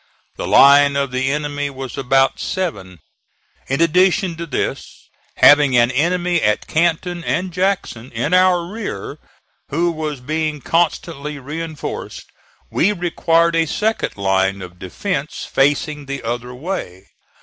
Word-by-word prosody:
The - - -5
line 140 0 +6
of 140 -2 -1
the 130 +1 0
enemy 145 -1 -2
was 135 -2 -7
about 135 0 +2
seven. 100 - -4 0.7
In 135 +4 -1
addition 180 +1 +3
to 170 0 -5
this, 140 - -4 0.3
having 145 -3 +6
an 120 +1 +4
enemy 175 +4 +1
at 105 0 +1
Canton 170 +2 0
and 180 +2 -2
Jackson, 180 - -2
in 120 +9 -2
our 180 -1 +4
rear, 200 - -6 0.5
who 170 +4 +1
was 155 -3 -4
being 155 +3 -2
constantly 150 -1 -1
reinforced, 155 +3 -6 0.5
we 195 - +2
required 170 -2 +1
a 165 0 +2
second 215 - -1
line 95 0 0
of 90 0 -12
defence 150 - -4
facing 145 +1 0
the 140 -1 -5
other 120 +2 -4
way. 125 - -5
150 Hz, 130 wpm, -19 LUFS, 130-170 Hz, 0.7 s, line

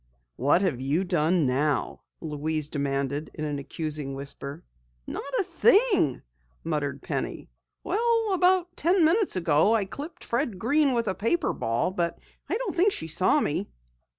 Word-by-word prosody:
"What 145 +9 +3
have 150 -10 0
you 145 +7 +1
done 170 -2 +2
now?" 140 +3 0 0.2
Louise 155 -1 -3
demanded 140 0 -2
in 155 - -3
an 145 -1 -3
accusing 145 -1 -4
whisper. 140 +3 -6 0.4
"Not 280 - -6
a - - +2
thing," 405 - +3 0.4
muttered 145 -4 -2
Penny. - - -4 0.3
"About 380 -5 +2
ten 345 +1 +3
minutes 370 - +2
ago 165 +4 +3
I 210 -3 +1
clipped 290 - -8
Fred 235 -4 -1
Green 275 +7 +2
with 235 -2 0
a 190 - +1
paper 265 - 0
ball, 115 +10 -1
but 170 -3 -1 0.3
I - - 0
don't 470 -7 -3
think 375 +4 +4
she - - -4
saw 185 - +3
me." 145 - -2
175 Hz, 150 wpm, -26 LUFS, -, 0.4 s, think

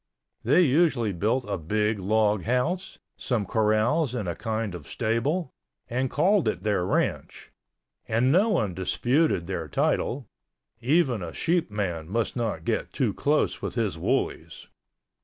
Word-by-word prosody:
They - - +4
usually 140 - +2
built 115 +8 0
a 100 - -2
big 105 +6 0
log 105 +1 +2
house, 160 - -1 0.2
some 115 -5 -1
corrals 115 - +1
and 105 -6 -3
a 85 - -1
kind 110 -3 -3
of 85 -5 -9
stable, 125 +8 -1 0.4
and 130 +2 -1
called 180 - +2
it 110 - -1
their 105 -4 +1
ranch, - - -2 0.6
and 120 +4 +2
no 195 +8 +4
one 110 - +1
disputed 120 - +1
their 85 -3 -4
title—even 120 - -1
a 85 -2 -6
sheepman 105 - -1
must 115 +2 -1
not 110 -10 -2
get - - -1
too - - 0
close - - 0
with - - -4
his - - 0
woolies. - - -2
115 Hz, 140 wpm, -26 LUFS, 100-135 Hz, 0.6 s, They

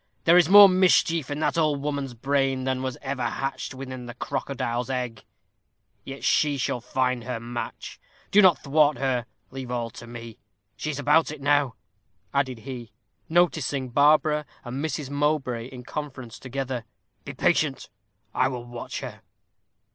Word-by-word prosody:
There 165 - +6
is 175 -2 +5
more 205 +1 +11
mischief 180 -5 +3
in 145 - -3
that 165 - +1
old 150 -3 +2
woman's 140 -4 -3
brain 135 +1 0
than 130 0 -1
was 130 -1 -3
ever 135 -1 -3
hatched 135 +3 -3
within 130 -2 -7
the 120 - -8
crocodile's 125 -1 -3
egg; 125 -4 -3 0.8
yet 135 +1 -8
she 145 -2 +2
shall 125 -2 -1
find 125 0 -1
her 125 -1 -4
match. 120 +1 -6 0.3
Do 210 - +7
not 185 -4 +6
thwart 150 -1 +3
her; 125 -2 -1 0.2
leave 130 -1 -7
all 120 -2 -2
to 120 0 -11
me. 115 -1 -9 0.4
She 155 - -4
is 150 - -3
about 150 +3 +3
it 155 -1 -7
now," 145 -3 +2 0.6
added 130 -4 0
he, 120 -3 -8 0.4
noticing 160 -6 +1
Barbara 150 +3 +3 0.2
and 130 +4 -4
Mrs. 150 -3 -3
Mowbray 145 -5 0
in 125 -1 -10
conference 130 -4 -7
together. 130 -2 -4 0.4
"Be - - -7
patient - - +1 0.5
I 130 - +3
will 125 -2 -5
watch 120 0 -6
her." - - -8
135 Hz, 155 wpm, -25 LUFS, 125-150 Hz, 0.8 s, more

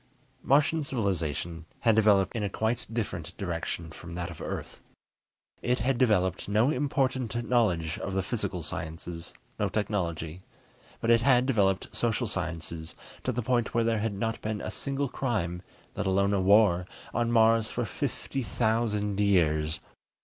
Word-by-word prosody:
Martian 150 +4 +3
civilization 85 - -2
had 115 -2 +4
developed 105 -2 +4
in 115 - -1
a 100 - 0
quite 110 +4 -1
different 100 -7 -4
direction 85 -3 -3
from 85 +2 -9
that 85 0 -3
of 85 - -10
Earth. - - -5 0.8
It 125 +1 +1
had 125 +2 0
developed 100 -8 +2
no 110 +7 +3
important 130 -4 0
knowledge 90 -10 +1
of 95 - -4
the 95 - +1
physical - - -2
sciences, 85 +1 -6 0.2
no - - +1
technology. 90 -5 -2 0.6
But 115 - +2
it 115 0 +6
had 125 -1 +4
developed 100 -7 +1
social 120 +1 +1
sciences 85 -4 -4 0.3
to 130 - 0
the 125 0 -2
point 120 -1 0
where 115 - +4
there 115 -1 +1
had 105 -1 -1
not 115 +2 -2
been 110 -1 -2
a - - -4
single 140 0 -2
crime, 100 -10 -2 0.3
let - - -2
alone 100 +1 +2
a 100 - +2
war, 95 -2 +5 0.3
on 120 0 +1
Mars 115 -1 +4
for 120 - -2
fifty 135 +6 -3
thousand 110 -3 0
years. 80 -6 +2
105 Hz, 155 wpm, -28 LUFS, 90-120 Hz, 0.8 s, it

